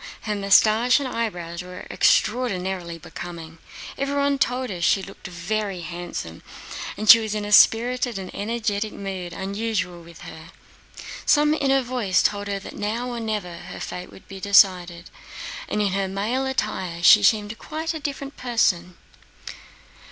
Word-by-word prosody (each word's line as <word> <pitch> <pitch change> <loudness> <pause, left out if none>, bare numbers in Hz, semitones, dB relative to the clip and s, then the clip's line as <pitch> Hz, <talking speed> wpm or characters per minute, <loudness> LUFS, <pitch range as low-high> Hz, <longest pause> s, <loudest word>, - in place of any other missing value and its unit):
Her 215 - -2
mustache 215 +4 +4
and 280 - -3
eyebrows 180 -8 -4
were 180 0 -9
extraordinarily 190 -7 +1
becoming. 165 -1 -9 0.4
Everyone 280 0 0
told 250 -2 0
her 175 -2 -6
she 190 +3 +2
looked 195 0 -10
very 185 +2 -3
handsome, 170 - -6 0.6
and 215 - -4
she 230 - +11
was 215 -1 -3
in 210 -1 -3
a 205 - -5
spirited 240 +2 +4
and 190 -1 -7
energetic 215 -1 -2
mood 190 -3 -6
unusual 190 -1 -3
with 170 0 -14
her. 160 +1 -11 0.7
Some 300 0 +4
inner 270 -3 +2
voice 235 -8 +1
told 205 0 0
her 200 0 -2
that 195 - -9
now 225 +4 -3
or 240 - -4
never 210 -6 -4
her - - -9
fate 180 0 -7
would - - -16
be 195 -1 -9
decided, 180 -3 +3 0.6
and 210 - 0
in 200 - 0
her 195 0 0
male 220 +8 -2
attire 180 -9 -3
she 210 +3 +8
seemed 210 +1 +2
quite 320 +1 -4
a 320 - -5
different 280 -1 -5
person. 180 -8 0
205 Hz, 150 wpm, -23 LUFS, 180-235 Hz, 0.7 s, she